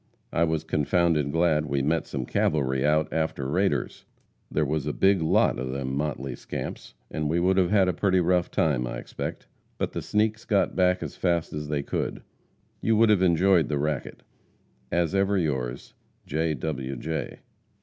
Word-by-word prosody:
I 85 - +3
was 80 -1 -1
confounded 80 -1 +1
glad 80 -2 +2
we 70 -2 0
met 80 +3 0
some 65 -3 -4
cavalry 65 -2 +1
out 75 +1 +3
after 80 -4 -1
raiders. 95 +7 0 0.5
There 75 - +1
was 75 0 -1
a - - -1
big 95 -2 +3
lot 80 -5 +2
of 65 0 -3
them 65 0 -3
motley 70 -3 -3
scamps, - - -7 0.2
and 75 -1 -2
we 85 +2 +1
would 95 +2 +3
have 90 -2 +3
had 100 -3 +4
a 90 - +1
pretty 95 -1 +2
rough 90 0 +2
time, 65 -6 +1
I - - -4
expect. - - -6 0.3
But - - -2
the - - -4
sneaks 110 +1 0
got 105 -4 +1
back 90 -1 +2
as - - -6
fast 85 -3 0
as 75 0 -4
they 75 -1 -1
could. - - -3 0.6
You 110 - +2
would 110 0 +5
have 100 -3 +3
enjoyed 90 0 +4
the 75 - 0
racket. 75 -1 -3 0.7
As 85 0 +1
ever 100 +1 +2
yours, 65 -7 -2 0.3
J. 80 +1 -1
W. 70 -1 -4
J. 80 +6 -4
80 Hz, 180 wpm, -26 LUFS, 70-90 Hz, 0.7 s, would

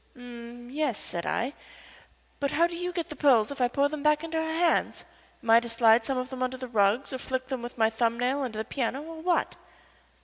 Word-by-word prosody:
"H'm 240 0 -10
yes," 285 -6 0
said 170 - -4
I. 245 +5 -1 0.9
"But 280 - 0
how 335 +4 +3
do 345 0 -3
you 355 +1 -3
get 345 -1 -4
the 300 - -7
pearls 265 -5 +4
if 280 - -5
I 245 - +4
pour 280 +3 +2
them 300 0 -5
back 300 +1 +3
into 325 0 -2
her 320 0 -2
hands? 335 +1 +1 0.4
Am 230 - +1
I 230 - +9
to 235 0 -6
slide 230 0 +5
some 270 +1 -1
of 255 +1 -3
them 260 -1 -6
under 255 0 -1
the 255 0 -6
rugs, 220 +3 +2
or 260 - -3
flick 260 0 -3
them 260 -3 -3
with 240 +1 -8
my 220 -1 +3
thumb 230 +1 0
nail 260 +3 +1
under 245 -5 -4
the 220 - -3
piano 265 +2 -2
or 320 0 -9
what?" 350 +1 0
255 Hz, 240 wpm, -28 LUFS, 235-300 Hz, 0.9 s, I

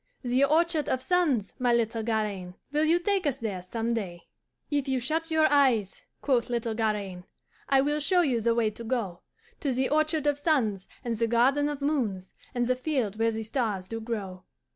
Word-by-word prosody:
The 250 +2 +2
orchard 315 +1 +2
of 255 0 -1
suns, 295 - +1
my 250 -1 +2
little 230 -1 +1
Garaine, 210 -5 -2 0.2
Will 300 +1 +2
you 330 +2 +4
take 380 -1 0
us 270 -2 0
there 210 -7 -4
some 225 +5 -2
day?' 180 -7 -4 0.5
"'If 285 -1 0
you 265 -1 +1
shut 320 +7 -1
your 315 -1 +3
eyes,' 255 -9 +3 0.2
quoth 250 -4 +1
little 235 -2 -1
Garaine, 205 -5 -2 0.4
'I 270 -1 +5
will 295 +2 0
show 355 +4 +3
you 260 -8 +1
the 230 +1 +2
way 225 -2 +2
to 230 - -10
go 225 -7 -2 0.4
To 280 - 0
the 260 +1 0
orchard 310 0 +1
of 290 -1 +1
suns, 235 - +1 0.2
and 230 -2 -2
the 230 - +2
garden 265 +5 +3
of 290 -1 -5
moons, 225 -11 -1 0.2
And 245 0 +1
the 255 +1 +2
field 250 -6 -2
where 225 0 +3
the 225 0 -3
stars 215 -5 -2
do 225 +2 -5
grow. 200 -5 -5
240 Hz, 195 wpm, -28 LUFS, 220-290 Hz, 0.5 s, I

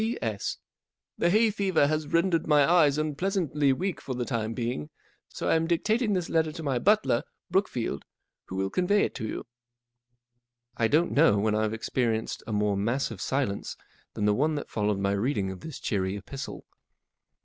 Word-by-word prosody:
44 225 +2 -1
P.S.—The 110 +9 -5
hay 215 +4 +4
fever 195 -7 +2
has 155 +1 -1
rendered 170 +1 +1
my 145 -2 +5
eyes 155 -5 +4
unpleasantly 155 -2 0
weak 180 +7 -2
for 130 - -4
the 125 0 -2
time 115 -3 -2
being, 115 -11 -3 0.4
so - - -5
I - - +4
am 165 0 +2
dictating 215 +6 +1
this 180 -3 -1
letter 160 -1 +1
to 160 - -7
my 135 -4 0
butler, 205 - +3 0.3
Brookfield, 130 - 0 0.4
who 95 - -7
will 95 0 -1
convey 200 +3 +2
it - - -1
to 110 - -4
you." - - -5 1.3
I 115 - +2
DON'T 160 +7 +2
know 105 - +5
when 105 +1 +1
I've 110 0 0
experienced 115 -1 -1
a - - -4
more 105 -1 +1
massive 115 0 -1
silence 130 -7 -2 0.4
than 105 - -1
the 105 - +4
one 150 +7 +1
that 145 - -5
followed 105 -1 0
my 100 0 0
reading 100 -1 0
of 95 - -8
this 160 - -8
cheery 95 -2 -1
epistle. 135 +6 -7
140 Hz, 175 wpm, -27 LUFS, 110-170 Hz, 1.3 s, my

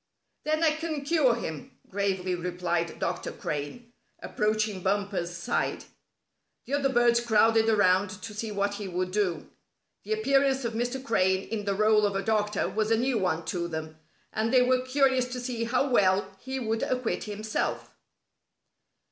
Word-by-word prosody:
"Then 310 +1 +1
I 320 - +5
can 310 -2 -4
cure 285 -6 +3
him," 160 -10 -7
gravely 190 -2 -1
replied 175 -1 -2
Dr. - - -3
Crane, 150 +12 -5 0.3
approaching 215 -2 -1
Bumper's 195 -2 -1
side. 170 +8 -1 0.8
The 270 - -6
other 280 -1 +2
birds 240 -2 +4
crowded 225 -1 +4
around 205 -2 +3
to 225 - -6
see 215 +1 -4
what 200 0 0
he 205 -1 -5
would 185 0 -2
do. 195 -3 -1 0.5
The 435 - -2
appearance 275 - +2
of 230 - -2
Mr. 245 +3 -2
Crane 190 -4 +2
in 210 -2 -3
the 200 -1 0
rôle 215 0 +4
of 200 -1 +1
a 195 - -1
doctor 210 -2 0
was 215 +3 -1
a 225 - +3
new 245 0 +1
one 170 -4 -1
to 170 -1 -2
them, 160 -1 -6 0.3
and 220 +1 0
they 255 -1 +6
were 255 0 +2
curious 260 -1 +2
to 250 - -3
see 245 -2 -3
how 255 +4 +1
well 195 -5 +2
he 265 +3 -4
would 225 -2 -1
acquit 250 -2 -1
himself. 215 +1 -3
215 Hz, 165 wpm, -28 LUFS, 190-250 Hz, 0.8 s, they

